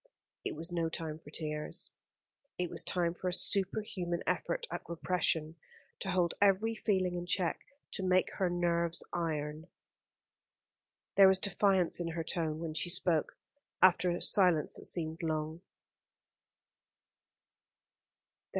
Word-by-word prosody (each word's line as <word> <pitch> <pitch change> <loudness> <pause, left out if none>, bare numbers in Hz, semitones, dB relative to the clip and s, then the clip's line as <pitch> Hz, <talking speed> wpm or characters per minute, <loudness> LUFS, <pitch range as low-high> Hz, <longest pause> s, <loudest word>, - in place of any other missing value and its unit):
It - - -3
was 165 +3 -4
no 165 -2 0
time 160 -1 -5
for 145 - -14
tears. 150 -1 -3 0.7
It 180 -1 -2
was - - -3
time 170 -2 0
for 185 - -5
a - - -2
superhuman 185 -2 0
effort - - -1
at - - -3
repression, 165 -2 0 0.4
to 195 - -4
hold 180 -2 +1
every 205 +3 +4
feeling 190 -5 0
in 175 0 -4
check, 180 -1 +1 0.3
to - - -3
make 185 0 +2
her 190 -3 +1
nerves 170 -1 +1
iron. 155 -2 -3 1.5
There 195 -1 +9
was 190 0 +5
defiance 190 -2 +2
in 175 - -2
her 165 0 -3
tone 160 -2 -2
when 160 -1 -4
she 170 +3 -1
spoke, 170 -3 +1 0.4
after 185 0 +5
a 175 - -1
silence 180 -6 +5
that - - -8
seemed 160 -1 -2
long. 160 0 -2
175 Hz, 130 wpm, -32 LUFS, 160-185 Hz, 1.5 s, There